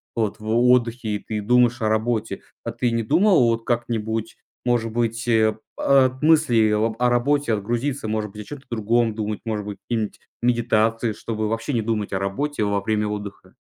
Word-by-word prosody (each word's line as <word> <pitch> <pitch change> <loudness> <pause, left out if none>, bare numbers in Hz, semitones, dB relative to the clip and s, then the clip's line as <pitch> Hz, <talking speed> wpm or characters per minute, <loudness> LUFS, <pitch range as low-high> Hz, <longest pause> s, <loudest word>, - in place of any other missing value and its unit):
вот 110 -2 -1
в 110 - -9
отдыхе 120 0 +2
и - - -3
ты 105 0 -4
думаешь 120 +2 +3
о 110 - +1
работе. 110 0 -1 0.2
А - - -3
ты 120 -2 -1
не 115 0 0
думал 190 - +4
вот 115 0 -1
как-нибудь, 115 -2 -2 0.3
может 120 -2 0
быть, 115 0 -2
э, 110 -2 +3 0.2
от 130 -1 +3
мыслей 150 -9 +4
об 110 +1 +1
о 125 - +4
работе 125 +1 +1
отгрузиться? 120 +5 -2
Может 105 -1 -2
быть, 105 - -9
о - - -10
чём-то 145 +2 -10
другом 115 0 +1
думать, 105 -1 -3
может 105 -2 -3
быть, 105 -1 -6
какие-нибудь 110 -3 -2 0.2
медитации, 115 -1 +1
чтобы 110 0 -3
вообще 115 +5 -2
не 115 - +1
думать 105 -2 -2
о 95 - 0
работе 110 +7 -2
во 100 -1 0
время 105 0 0
отдыха. 105 -1 -7
115 Hz, 185 wpm, -23 LUFS, 110-120 Hz, 0.3 s, думал